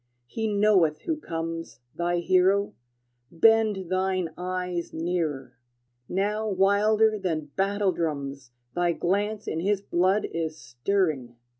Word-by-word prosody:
he 220 - -3
knoweth 200 -7 +3
who 325 - -1
comes, 165 - -5
Thy 175 0 0
hero: 185 +3 +3 0.6
bend 210 0 +3
thine 185 -2 0
eyes 180 -1 -3
nearer! 155 -7 -3 0.5
Now 210 +3 0
wilder 210 +3 +3
than 155 -6 -3
battle 200 0 +1
drums 140 -6 -4 0.2
Thy 175 -1 +1
glance 205 +5 -1
in 160 - -2
his 200 +3 +1
blood 185 +3 +2
is 160 -1 -3
stirring! 125 0 -1
180 Hz, 115 wpm, -26 LUFS, 165-200 Hz, 0.6 s, knoweth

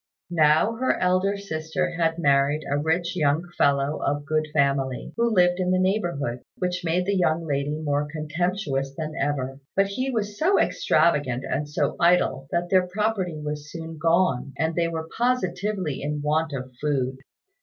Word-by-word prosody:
Now 160 +7 +3
her 260 +2 +1
elder 185 +2 +2
sister 180 -1 -3
had 165 -1 0
married 140 -1 +2
a 140 - 0
rich 165 +4 0
young 155 +1 +1
fellow 140 +1 +2
of 145 +1 -1
good 155 +1 0
family, 140 -3 0
who 235 0 +2
lived 180 -4 +3
in 180 -1 0
the 185 - +3
neighbourhood, 175 - 0 0.2
which 180 -1 -2
made 175 +2 +1
the 200 +1 +1
young 165 -3 +1
lady 145 0 -1
more 145 -1 0
contemptuous 155 -3 -2
than 155 -1 -4
ever; 135 -2 -2 0.2
but 195 - +4
he 255 +7 -2
was 210 -4 -3
so 370 +5 +3
extravagant 145 -6 +2
and 145 +2 -2
so 145 - -1
idle 170 -6 +3
that 175 0 -1
their 185 -1 +4
property 190 -4 -1
was 150 0 -5
soon 165 -1 -7
gone, 165 -5 +2
and 160 +1 0
they 170 0 +1
were 160 -1 -4
positively 200 - -1
in 150 0 -3
want 155 +1 +1
of 130 -2 -5
food. 130 -3 0
160 Hz, 165 wpm, -25 LUFS, 145-180 Hz, 0.2 s, but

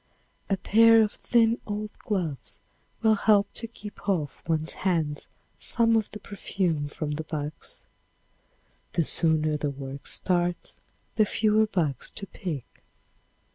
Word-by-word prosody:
A 195 - +2
pair 225 +3 +6
of 210 - 0
thin 230 -1 +2
old 210 0 -3
gloves 140 - -3 0.4
will 220 -1 +6
help 205 -1 +3
to 230 - -4
keep 210 -2 -8
off 155 -7 -1
one's 160 -1 0
hands 160 -6 0 0.3
some 230 -1 +2
of 220 -2 +1
the 210 - -8
perfume 185 -7 -2
from 150 +1 -4
the 155 +2 -3
bugs. 150 -1 -4 1.1
The 170 - +2
sooner 155 -1 +2
the 145 0 -1
work 135 0 -7
starts 175 -1 0 0.4
the 215 - +6
fewer 215 +1 +3
bugs 155 - -1
to 200 - -1
pick. 170 - -6
180 Hz, 135 wpm, -27 LUFS, 150-210 Hz, 1.1 s, pair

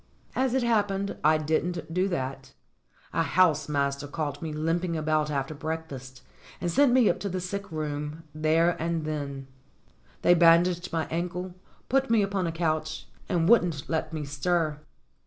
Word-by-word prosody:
As 260 -1 +1
it 260 - +2
happened 200 -4 +1
I 155 +1 +5
didn't 160 +2 -1
do 185 +2 +2
that. 135 -6 -4 0.6
A - - +2
house 155 -4 +3
master 140 0 -1
caught 145 -1 -4
me 160 -2 -4
limping 165 +3 -1
about 155 -1 +1
after 140 0 -2
breakfast 145 -5 -6 0.4
and 175 0 -1
sent 280 +3 +4
me 250 -3 +5
up - - +2
to 200 - -3
the 185 0 -2
sick 195 +2 -5
room 150 0 -4
there 160 +2 +3
and 165 -1 -1
then. 140 -3 -4 0.8
They 175 - +7
bandaged 175 +1 +4
my 165 -2 0
ankle, 180 +2 -3 0.3
put 270 0 +1
me 225 -3 +4
upon 195 -2 -1
a - - -1
couch, 155 -1 -2 0.2
and 170 -2 +2
wouldn't 175 - +3
let 160 -1 -1
me 155 -2 -4
stir. 150 +2 0
165 Hz, 160 wpm, -27 LUFS, 150-180 Hz, 0.8 s, They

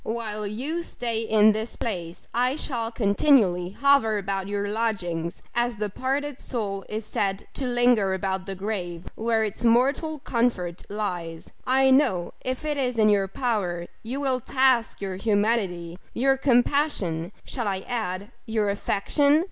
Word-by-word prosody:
While 215 -2 -3
you 275 +11 -3
stay 235 -8 -3
in 220 -1 +5
this 220 +2 -3
place, 175 -6 -5
I 250 +3 +2
shall 235 -7 -3
continually 205 -5 +3
hover 275 -6 +4
about 195 -1 -2
your 205 0 -2
lodgings, 190 -7 -2
as 240 0 +1
the 210 -1 -3
parted 275 +4 -2
soul 200 -5 -3
is 215 0 -4
said 195 -1 -1
to 265 - -3
linger 240 -6 +3
about 190 0 -2
the 195 - -4
grave 180 -4 -4
where 225 0 +1
its 215 +1 -3
mortal 270 +7 +3
comfort 230 - -1
lies. 175 -6 -4 0.2
I 265 +1 +4
know, 190 -11 +3
if 255 +3 -3
it 300 -1 -1
is 250 -3 -1
in 215 -1 +5
your 200 -2 +3
power, 195 -7 -1 0.2
you 250 +5 -4
will 265 -3 0
task 255 -3 +2
your 190 -2 -3
humanity 200 -5 0 0.2
your 270 +3 +3
compassion 245 - +1
shall 240 -5 -3
I 190 -1 -1
add, 205 -3 -3 0.2
your 215 -2 +1
affection? 285 +9 +2
220 Hz, 150 wpm, -25 LUFS, 195-250 Hz, 0.2 s, in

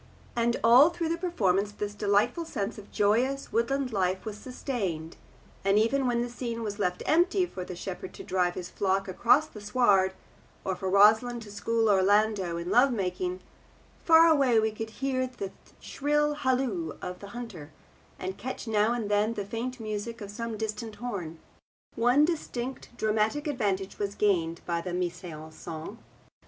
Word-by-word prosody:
And 235 0 +1
all 250 +7 +8
through 340 -1 -3
the 335 - 0
performance 205 - +1
this 205 0 -4
delightful 210 +9 +1
sense 210 -9 -4
of 205 - -14
joyous 245 +7 +1
woodland 250 +2 0
life 185 0 0
was 215 -2 -4
sustained, 205 - -4 0.5
and 195 +1 +3
even 255 +5 +2
when 240 -1 +1
the - - -3
scene 235 -1 -4
was 205 -1 -4
left 180 -3 -1
empty 360 +3 +3
for 190 - -7
the 180 - -7
shepherd 185 +1 -6
to - - -8
drive 180 -1 0
his 180 -1 -5
flock 195 +1 0
across 235 +10 +4
the 220 -9 -12
sward, 205 -4 +3 0.5
or 190 - 0
for 190 +1 -3
Rosalind 220 +5 +5
to 205 - -11
school 225 +2 0
Orlando 200 -2 +3
in 170 +1 -4
love 260 +3 +5
making, 185 -3 -2 0.6
far 325 0 +7
away 275 -8 +4
we 220 0 +1
could 220 +1 -5
hear 255 +2 -1
the 220 -6 -6 0.3
shrill 295 +1 0
halloo 250 - -1
of 180 0 -6
the 200 - -9
hunter, 185 -11 -8 0.5
and 190 +2 -5
catch 260 0 -5
now 215 +1 +2
and 235 -3 -2
then 210 +2 +1
the 205 - -3
faint 240 +5 -4
music 220 +1 -4
of 205 -2 -7
some 230 +1 -4
distant 220 0 -4
horn. 185 -10 -5 0.6
One 245 +6 +4
distinct 265 -6 -4
dramatic 220 +7 +1
advantage 205 -9 -1
was 200 -1 -2
gained 170 -5 +1
by 170 -1 -1
the 180 0 -4
mise 180 0 -2
en 155 -2 -8
scene. 165 +7 -8
215 Hz, 170 wpm, -28 LUFS, 190-245 Hz, 0.6 s, all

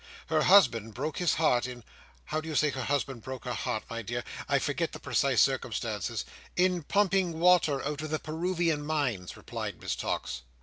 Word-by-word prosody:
Her 155 -1 +3
husband 120 - +5
broke 145 +4 -3
his 175 -4 +2
heart 130 -6 +2
in—how 125 +5 -7
did 160 - -9
you 155 - -3
say 150 0 +3
her 130 -2 -4
husband 135 -3 -1
broke 130 +1 -7
his 125 - -2
heart, 110 - -2
my 115 0 -4
dear? 120 +2 -3 0.3
I - - +4
forget - - -1
the - - -7
precise - - +2
circumstances. - - -2 0.3
"In 180 -1 +2
pumping 190 -1 +1
water 170 -6 +4
out 150 0 -2
of 155 - -4
the 155 - 0
Peruvian 165 -1 -1
Mines," 140 - -2
replied - - -5
Miss - - -2
Tox. - - -3
150 Hz, 180 wpm, -29 LUFS, 125-165 Hz, 0.3 s, husband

